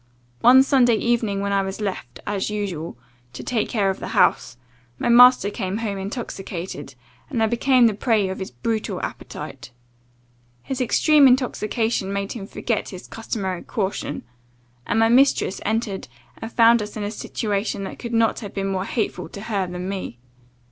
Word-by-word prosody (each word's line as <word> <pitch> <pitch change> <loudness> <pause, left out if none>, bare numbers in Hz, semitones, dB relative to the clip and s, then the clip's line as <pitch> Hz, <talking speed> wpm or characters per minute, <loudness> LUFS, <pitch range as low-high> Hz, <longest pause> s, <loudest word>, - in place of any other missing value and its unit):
One 255 +2 +7
Sunday 250 -4 +4
evening 220 -3 0
when 200 0 -1
I 200 - +3
was 195 +1 -5
left, 185 - -5
as 205 -1 -2
usual, 190 -9 -4 0.4
to - - -7
take 230 -4 -1
care 200 -4 +1
of 190 - -7
the - - -5
house, 120 - +3 0.4
my - - -1
master 245 -3 +7
came 195 -1 -3
home 210 -3 -3
intoxicated, 190 - -6 0.3
and 240 -6 0
I - - +5
became 245 +2 +3
the 225 - +4
prey 210 -1 +1
of 190 - -5
his 190 - -5
brutal 215 - -3
appetite. - - -7 0.9
His 265 -1 -3
extreme 290 +4 +5
intoxication 230 -5 0
made 200 0 -3
him 200 -5 -6
forget 230 0 -2
his 185 -2 -9
customary 195 -5 -4
caution, 190 -8 -3 0.6
and 230 - 0
my 225 0 +5
mistress 250 -5 +3
entered 220 -2 -2 0.3
and 225 - -8
found 230 0 +5
us 210 +1 -6
in 210 - -3
a 205 - -3
situation 205 -2 -3
that 190 - -7
could 235 - -6
not 230 -1 +2
have 205 -4 -9
been 195 -1 -1
more 190 0 -2
hateful 220 -1 -3
to 200 - -9
her 200 -4 -2
than 180 +1 -5
me. 190 -10 -5
210 Hz, 170 wpm, -22 LUFS, 195-235 Hz, 0.9 s, One